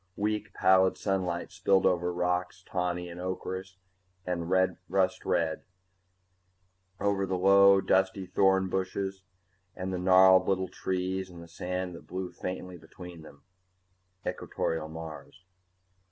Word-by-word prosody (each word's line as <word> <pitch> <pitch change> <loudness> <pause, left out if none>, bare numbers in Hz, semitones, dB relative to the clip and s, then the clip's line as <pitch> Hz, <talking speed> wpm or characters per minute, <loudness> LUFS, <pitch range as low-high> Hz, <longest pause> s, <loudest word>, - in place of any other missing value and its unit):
Weak 105 0 -2
pallid 95 0 +4
sunlight 90 -3 -2
spilled 95 -1 +2
over 90 0 +2
rocks 90 +1 -2
tawny 90 -1 -2
and 85 +1 -8
ocherous 95 +1 -5 0.5
and 85 -2 -3 0.4
rust 95 0 +1
red, 80 -1 0 1.4
over 100 -1 0
the 95 0 -1
low 100 +1 +6
dusty 95 0 +1
thorn 95 +1 +3
bushes 95 +1 -3 0.5
and 95 0 -4
the 90 - -2
gnarled 95 0 +6
little 95 -1 0
trees 95 0 -3
and 85 -1 -11
the - - -13
sand 90 +2 -4
that 85 - -12
blew 90 0 -5
faintly 90 -1 -6
between 85 +1 -11
them. 70 -2 -15 0.8
Equatorial 80 -1 -3
Mars! 80 +3 -9
95 Hz, 125 wpm, -29 LUFS, 90-95 Hz, 1.4 s, low